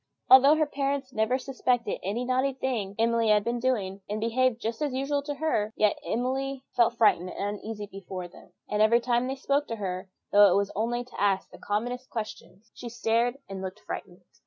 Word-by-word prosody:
] - - -47
Although 270 +3 +9
her 310 0 +2
parents 275 -2 -2
never 220 +4 +1
suspected 250 -4 -1
what 210 +6 -2
naughty 260 +2 +1
thing 240 -7 -3
Emily 230 0 +2
had 210 -1 +4
been 235 +2 -1
doing, 205 -6 -1
and 210 +1 -2
behaved 235 +2 +1
just 230 +2 -4
as 290 -4 -1
usual 280 +2 0
to 290 0 -5
her, 250 -8 -1
yet 210 -1 +2
Emily 265 +2 -2
felt 240 -1 +3
frightened 185 -5 +3
and 205 +2 -4
uneasy 215 -1 -6
before 190 -2 -7
them; 175 - -17 0.2
and 210 0 0
every 225 +2 +5
time 240 +1 +1
they 265 - -2
spoke 280 +2 0
to 230 - -3
her, 185 -3 -4 0.2
though 205 -1 +7
it - - +3
was 200 0 0
only 240 +3 -1
to 245 -4 -9
ask 195 -2 +1
the - - -13
commonest 245 +5 -3
question, 215 -3 -7
she 240 - -8
stared 235 +2 0
and 195 -1 -6
looked 190 +2 -6
frightened. 180 0 -7
235 Hz, 205 wpm, -27 LUFS, 205-260 Hz, 0.2 s, Although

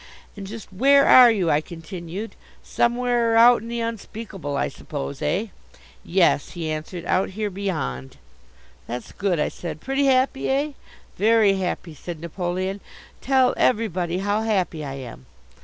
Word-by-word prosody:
"And 200 -2 -8
just 215 -1 -9
where 275 +7 +5
are 250 -1 +9
you?" 195 -7 +1
I 145 - +3
continued. 170 +5 -8 0.3
"Somewhere 240 -1 +1
out 235 0 +7
in 225 - -9
the 235 0 -3
Unspeakable, 215 -8 -5
I - - 0
suppose, 70 +1 -6
eh?" 210 +4 -1 0.5
"Yes," 175 -5 +2
he 165 -3 -4
answered, 155 +3 -5
"out 185 +1 +1
here 205 +1 -3
beyond." 155 - -4 0.7
"That's 125 +1 -6
good," 190 -5 -1
I - - +1
said. 160 -3 -7
"Pretty 270 - 0
happy, 265 0 +2
eh?" 280 +3 +1 0.5
"Very 215 -1 +4
happy," 180 -2 -3
said 165 +2 -8
Napoleon. 185 +3 -3 0.4
"Tell 260 -1 +3
everybody 180 -7 +1
how 205 +3 0
happy 190 -8 -1
I 135 -1 -5
am." 120 - -10
195 Hz, 145 wpm, -23 LUFS, 170-230 Hz, 0.7 s, are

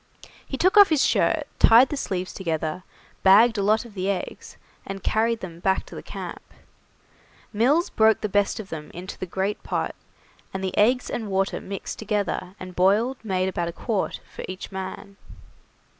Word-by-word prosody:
He 270 - -4
took 370 +8 +3
off 405 -1 +9
his 310 -4 +3
shirt, - - +2
tied 240 +4 +7
the - - -2
sleeves 185 -9 -3
together, 160 -2 -3 0.4
bagged 215 +3 +6
a - - +1
lot 215 +4 +2
of 230 - -13
the 190 0 -2
eggs, 190 -3 -5 0.3
and 195 -1 -7
carried 225 +1 +1
them 170 -3 -8
back 190 +2 +1
to - - -13
the - - -7
camp. - - -7 1.1
Mills 275 +11 +2
broke 220 0 +4
the 215 - 0
best 205 +1 +1
of 205 -3 -7
them 150 -2 -7
into 180 +3 -8
the 185 - -4
great 190 +4 -2
pot, - - -2 0.6
and 190 - -3
the 190 -1 -2
eggs 245 +4 +3
and 220 -3 -3
water 195 0 0
mixed 195 -1 -6
together 200 -3 -2
and 185 -1 -9
boiled 210 +8 +3
made 185 -3 0
about 175 -2 -2
a - - -3
quart 210 +1 -2
for - - -9
each 185 +2 -7
man. 190 +1 -7
200 Hz, 180 wpm, -24 LUFS, 185-225 Hz, 1.1 s, off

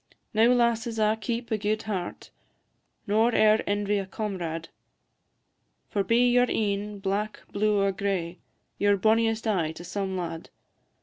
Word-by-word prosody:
Now 220 +2 +5
lasses 235 -1 +1
a' 215 0 +3
keep 235 +2 -4
a 220 - +1
gude 215 +2 -1
heart, 190 -5 -5 0.7
Nor 220 +3 +2
e'er 215 0 +5
envy 205 0 0
a 195 - -5
comrade, 175 -6 -4 1.2
For 200 - +1
be 235 +5 +3
your 245 0 +4
een 205 -1 -1
black, 200 +2 -3
blue, 210 0 +1
or 195 - +2
gray, 185 -3 -2 0.4
Ye 205 - +2
're 205 0 +4
bonniest 225 +2 +2
aye 180 -8 +1
to 170 - -10
some 190 +1 -3
lad. 165 -2 -5
210 Hz, 145 wpm, -27 LUFS, 195-220 Hz, 1.2 s, Now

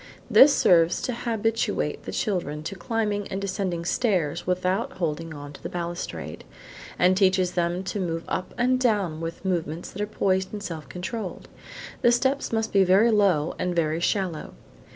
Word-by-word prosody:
This 285 - +9
serves 170 -10 +4
to 250 - -1
habituate 225 -1 -1
the - - -4
children 170 - -2
to 160 - -4
climbing 205 +1 -2
and 190 - -4
descending 185 -3 -2
stairs 175 - 0
without 185 +8 0
holding 165 -2 -3
on 145 -1 -8
to - - -13
the - - -5
balustrade, 175 0 -5 0.5
and 180 +1 +4
teaches 185 -2 +3
them 175 +1 -1
to 190 +2 -3
move 165 -3 -2
up 185 +2 -3
and 255 +1 +2
down 200 -10 +1
with 165 +3 -6
movements 170 -3 -2
that 205 - -6
are 210 - -1
poised 190 -2 0
and 205 -1 -5
self 165 -6 -6
controlled. 185 +2 -5 0.5
The 240 - +5
steps 265 +3 +1
must 225 -1 -1
be 195 -1 +6
very 195 +5 +5
low 190 -8 +3
and 180 -1 -1
very 160 -1 +1
shallow. 175 -2 -1
185 Hz, 170 wpm, -25 LUFS, 170-210 Hz, 0.5 s, This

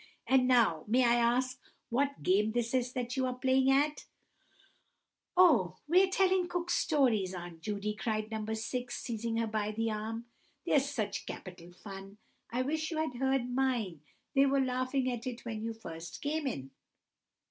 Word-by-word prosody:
"And 260 -1 +4
now 225 -11 +4
may 250 +4 +4
I 235 - +5
ask 245 +2 +2 0.3
what 280 +3 0
game 210 +4 +3
this 235 0 -1
is 250 -1 0
that 245 -1 -3
you 260 -1 +1
are 250 - -2
playing 260 +1 +3
at?" 290 +2 +2 1.3
"Oh, 300 - +5
we're 370 +4 +5
telling 375 -1 +2
Cook 350 0 -2
Stories, 230 - +2
Aunt 175 -2 -8
Judy," 210 +1 -2
cried 215 0 -2
No. 220 -1 -3
6, 240 +2 -3
seizing 230 -1 -3
her 230 - +1
by 215 -1 -1
the 225 +1 -1
arm; 220 +2 -4 0.4
"they're 290 - +4
such 230 -8 -3
capital 180 -2 -8
fun! 195 +2 -10 0.3
I 250 +2 0
wish 315 +4 -1
you 320 - -3
had 315 -3 -1
heard 265 -1 0
mine; 240 - 0 0.3
they 275 0 +5
were 275 0 +2
laughing 255 +1 0
at 240 0 -5
it 245 -1 -6
when 225 -2 -4
you 225 +1 -2
first 165 -7 -8
came 295 0 -1
in!" 135 - -4
240 Hz, 170 wpm, -32 LUFS, 215-270 Hz, 1.3 s, I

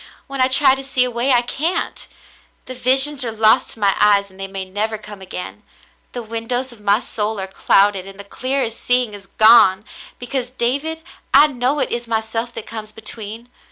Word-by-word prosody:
When 275 -1 -4
I 255 - +5
try 265 +1 +4
to 270 0 -4
see 265 -1 +1
a 250 - -1
way, 240 +3 0
I 245 -1 +4
can't. 315 +8 -3 0.6
The 255 - -7
visions 265 +3 +3
are 235 - -3
lost 220 0 +3
to - - -16
my 200 -2 +2
eyes, 200 -1 +3
and 190 - -19
they 195 - -5
may 195 0 -5
never 210 +4 -2
come 210 -2 -12
again. 185 -1 -7 0.5
The 245 - -5
windows 230 +3 -3
of 230 -3 -15
my 205 +1 +2
soul 215 -3 -3
are 190 - -3
clouded, 195 0 +2
and 195 0 -12
the - - -7
clear 255 +5 -1
seeing 245 -1 0
is 200 -1 -11
gone, 215 -3 +5 0.3
because, 250 0 -4
David, 280 +6 -2 0.3
I 285 +2 +8
know 265 0 -1
it 285 - -1
is 235 0 -3
myself 225 +1 -2
that 225 - -7
comes 215 -1 -8
between. 220 +1 -7
230 Hz, 195 wpm, -19 LUFS, 210-255 Hz, 0.6 s, I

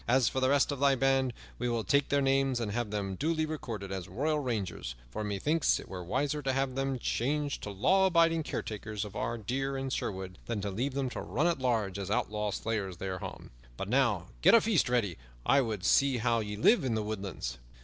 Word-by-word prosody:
As 125 0 +4
for 130 - 0
the 130 0 +3
rest 140 +1 +3
of 140 - -4
thy 140 -1 +4
band, 135 0 +2 0.3
we 120 0 0
will 115 -1 0
take 140 +3 +2
their 140 -1 +2
names 135 -1 +2
and 110 -3 -2
have 120 0 -2
them 100 -2 -2
duly 155 - 0
recorded 115 -11 -5
as 95 -2 -4
royal 150 +4 0
rangers; 105 - -3 0.2
for 110 - -3
methinks 125 +11 +1
it - - -10
were 90 -1 -6
wiser 140 - -1
to 135 -2 0
have 135 0 0
them 135 0 -1
changed 145 +5 -1
to - - -5
law 185 - +3
abiding 165 -2 +4
caretakers 110 -6 -4
of 105 0 -10
our 115 +3 -2
deer 135 +5 -2
in 135 0 -3
Sherwood 95 -5 -4
than 115 -3 -2
to 100 0 -2
leave 130 +7 -2
them 135 -2 -1
to - - -4
run 150 +6 -1
at 170 -4 +2
large 110 -7 0
as 95 - -4
outlawed 105 -1 -1
slayers 100 -5 -2
thereof. 95 0 -6 0.3
But 95 - -4
now 115 -8 +2
get - - +7
a 230 - +7
feast 200 - +2
ready; 105 - 0 0.3
I 140 - +5
would 110 -7 -3
see 135 +3 +4
how 115 0 +2
ye 105 -1 -3
live 170 - +4
in 125 -4 0
the 110 - -1
woodlands." 95 - -4
120 Hz, 220 wpm, -31 LUFS, 105-140 Hz, 0.3 s, get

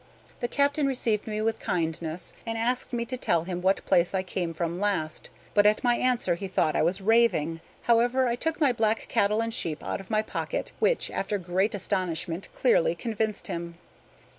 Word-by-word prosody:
The 240 - -1
captain 285 +2 +1
received 230 -6 0
me 215 0 -2
with 225 0 0
kindness, 165 0 -2
and 225 0 -3
asked 245 +3 -1
me 235 -1 -1
to 255 +2 -4
tell 170 -9 +1
him 180 0 -4
what 190 +2 +1
place 175 +2 +3
I 185 - +1
came 180 -2 -3
from 170 +1 -3
last; 190 -7 -1 0.2
but 205 0 +5
at 210 - +2
my 245 -1 +4
answer 245 -8 +1
he 195 +3 -4
thought 160 -4 +1
I - - +3
was 180 +5 +1
raving. 190 -7 +3 0.2
However, 240 +2 +3
I 235 - +1
took 320 +6 -2
my 290 -5 +4
black 225 -2 0
cattle 210 +2 +2
and 230 0 -3
sheep 165 -10 -2
out - - -3
of 195 - -15
my 215 -1 +2
pocket, - - -3
which, - - +2
after 205 +1 -1
great 190 +3 0
astonishment, 180 -3 -2
clearly - - +3
convinced 220 -2 -2
him. 170 0 -5
210 Hz, 190 wpm, -27 LUFS, 175-235 Hz, 0.2 s, but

